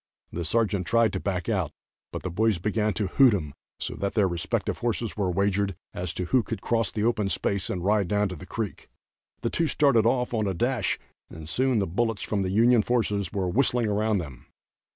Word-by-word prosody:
The 85 - -3
sergeant 100 0 0
tried 115 -2 +3
to 95 - -1
back 90 -3 -2
out, - - 0 0.4
but - - -6
the 95 - -3
boys 110 +2 +2
began 105 +4 0
to 105 - 0
hoot 120 +4 +5
him 75 -7 -4 0.3
so - - -4
that 100 0 -2
their 105 -4 +4
respective 85 -2 -2
horses 115 -1 -2
were 100 -3 0
wagered 100 +1 +1 0.2
as 90 -1 -3
to 90 - -2
who 130 +7 +3
could 115 -2 -5
cross 115 +1 0
the 105 - -2
open 110 -4 +1
space 100 -1 -1
and 90 -2 -3
ride 105 -2 +2
down 105 +2 +1
to 90 - -5
the 90 +3 -11
creek. 110 -5 -5 0.5
The - - -1
two 165 - +1
started 135 -8 +3
off 125 0 +1
on 110 -3 0
a 95 - -1
dash 120 +1 0 0.3
and 80 -1 -10
soon 130 +7 +1
the 100 - +2
bullets 115 +4 -1
from 105 -2 -1
the 95 - -1
Union 115 +4 +5
forces 105 -4 0
were 95 -3 -1
whistling 120 +4 +2
around 105 0 +1
them. 70 -9 -7
105 Hz, 215 wpm, -26 LUFS, 95-115 Hz, 0.5 s, hoot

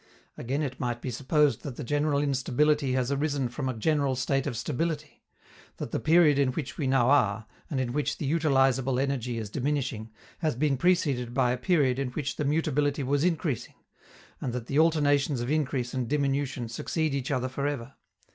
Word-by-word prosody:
Again 135 +5 -2
it 130 -3 -4
might 120 -1 -2
be 125 - -4
supposed 145 +4 +1
that 135 -4 -6
the - - -6
general 145 +3 +1
instability 140 +1 +1
has 130 0 0
arisen 140 -2 0
from 130 +2 -3
a 130 - -3
general 140 +1 +1
state 130 +1 0
of 120 - -3
stability; 155 +4 -3 0.6
that - - -5
the - - -1
period 155 -3 +4
in 130 -2 +2
which 145 0 -4
we 145 - -2
now 130 -1 +3
are, 110 -6 +2 0.2
and 135 - -1
in 125 -2 -2
which 150 +1 -1
the - - -4
utilizable 135 -4 +2
energy 130 -3 -1
is 110 -3 -5
diminishing, 130 -5 -2 0.3
has 155 -6 0
been 140 +2 +1
preceded 135 -7 +1
by 125 -2 +3
a - - +1
period 135 -2 +2
in 135 -2 -1
which 140 -1 -3
the 150 - -1
mutability 145 -1 +1
was 140 +2 +1
increasing, 165 - -1 0.6
and 125 - -3
that 125 -2 -4
the 140 +4 0
alternations 145 -4 +3
of 120 +3 -2
increase 135 -5 -1
and 130 -3 -2
diminution 140 -3 -1
succeed 155 +6 -2
each 135 -2 -2
other 130 -2 0
for 140 +2 -2
ever. 140 -5 -4
140 Hz, 190 wpm, -28 LUFS, 125-150 Hz, 0.6 s, period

